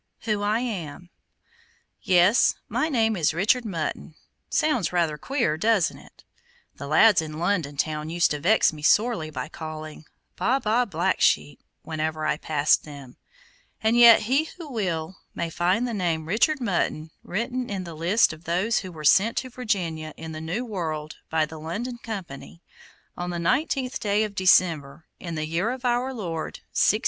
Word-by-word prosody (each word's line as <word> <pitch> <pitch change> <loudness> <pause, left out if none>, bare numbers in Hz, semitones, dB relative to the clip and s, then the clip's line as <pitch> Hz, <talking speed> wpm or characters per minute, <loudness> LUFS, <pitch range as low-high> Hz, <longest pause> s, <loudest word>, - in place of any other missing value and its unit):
WHO 210 -3 -1
I 210 +3 +1
AM 180 -7 -5 0.9
Yes, 185 +5 +4
my 315 - -1
name 225 -6 +2
is 160 -3 +1
Richard 220 +8 +2
Mutton. 160 -4 -4 0.3
Sounds 255 - +1
rather 170 -4 +1
queer, 235 - -1
doesn't 215 -1 +1
it? - - -19 0.5
The 140 - -7
lads 175 +5 +5
in 155 -1 -7
London 170 -5 -1
town 155 +1 -2
used 170 +1 +2
to 150 - -2
vex 185 +3 +3
me 150 - -10
sorely 210 0 +2
by 130 -4 -5
calling, 155 -1 -8 0.3
"Baa, 260 +3 +1
baa, 235 +1 +1
black 175 -5 -1
sheep," 75 0 +2 0.2
whenever 155 0 -3
I 155 - +1
passed 150 -1 +2
them, 140 -4 -11 0.7
and 220 +1 +3
yet 235 -1 +8
he 265 +8 +1
who 325 -5 -9
will 185 -5 -3 0.2
may 170 -1 -3
find 185 +9 +1
the 235 - -4
name 170 -6 -1
Richard 230 - +2
Mutton 170 -8 -1
written 245 +5 -3
in 195 -2 -3
the 170 -2 -8
list 170 +6 +2
of 155 +2 -14
those 185 +7 +1
who 185 -3 -8
were 155 -3 -10
sent 200 +9 +4
to 255 - -3
Virginia, 170 -11 -3
in 160 0 -7
the 155 0 -7
new 180 +10 -3
world, 160 -8 -4
by 160 -1 +2
the 155 +1 -10
London 230 +10 -5
Company, 175 -7 -8 0.5
on 175 0 -4
the 175 - -3
nineteenth 260 - 0
day 210 0 +1
of 210 -2 -4
December, 165 -6 +2
in 170 -2 -6
the 155 0 -2
year 170 +7 -1
of 255 0 -5
Our 245 +2 +1
Lord, 170 -10 -5
1606. 215 - +3
175 Hz, 170 wpm, -25 LUFS, 155-225 Hz, 0.9 s, yet